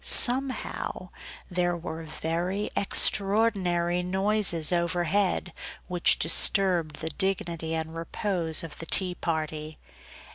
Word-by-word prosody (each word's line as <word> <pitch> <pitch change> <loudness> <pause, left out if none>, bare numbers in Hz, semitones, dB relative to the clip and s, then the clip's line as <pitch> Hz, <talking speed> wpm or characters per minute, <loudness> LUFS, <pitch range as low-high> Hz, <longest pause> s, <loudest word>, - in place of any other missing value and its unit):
Somehow 260 +1 +3 0.4
there 175 -1 0
were 165 -1 -6
very 170 +6 -3
extraordinary 195 -4 +2
noises 190 -3 +1
over 175 0 0
head, 180 0 0 0.3
which 180 -2 +3
disturbed 170 -1 +1
the 160 - -3
dignity 170 -2 -2
and 160 0 -4
repose 165 -1 -2
of 165 -2 -8
the 165 - -7
tea 185 +1 +1
party. 155 -2 -4
175 Hz, 105 wpm, -27 LUFS, 165-195 Hz, 0.4 s, Somehow